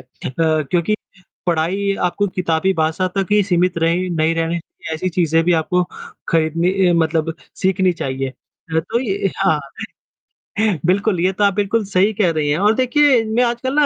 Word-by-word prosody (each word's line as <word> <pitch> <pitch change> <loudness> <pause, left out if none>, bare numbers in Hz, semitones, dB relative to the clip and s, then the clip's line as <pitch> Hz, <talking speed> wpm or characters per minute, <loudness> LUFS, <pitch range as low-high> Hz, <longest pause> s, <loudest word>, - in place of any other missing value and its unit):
अ, - - -13 0.4
क्योंकि 160 +4 +1 0.5
पढ़ाई 180 +4 0
आपको 190 +3 0
किताबी 180 0 0
भाषा 160 +2 0
तक 195 -1 +1
ही 210 0 +5
सीमित 180 -2 +1
रही 170 +3 +1
नहीं 160 -1 +1
रहनी 165 +1 -1
चाहिए 160 -1 -8
ऐसी 170 +4 -2
चीजें 165 -2 +1
भी 175 - +3
आपको 170 +2 +1 0.5
खरीदनी 165 +2 +1 0.2
अ, - - +3
मतलब 160 -1 0 0.3
सीखनी 190 -1 +2
चाहिए। 135 -4 -3
अ, 160 +4 -7
तो 220 +9 -2
ये 195 -5 -1
हाँ, 155 -2 +2 1.3
बिल्कुल, 195 +1 +1
ये 185 +2 +2
तो 205 - -1
आप 200 -1 +4
बिल्कुल 205 +3 0
सही 195 +2 +2
कह 200 -5 +2
रही 155 -2 -1
हैं 145 - +1
और 210 +3 +4
देखिए 260 0 +3
मैं 220 +3 +1
आजकल 240 +2 -1
ना 295 - +5
180 Hz, 175 wpm, -19 LUFS, 165-200 Hz, 1.3 s, ही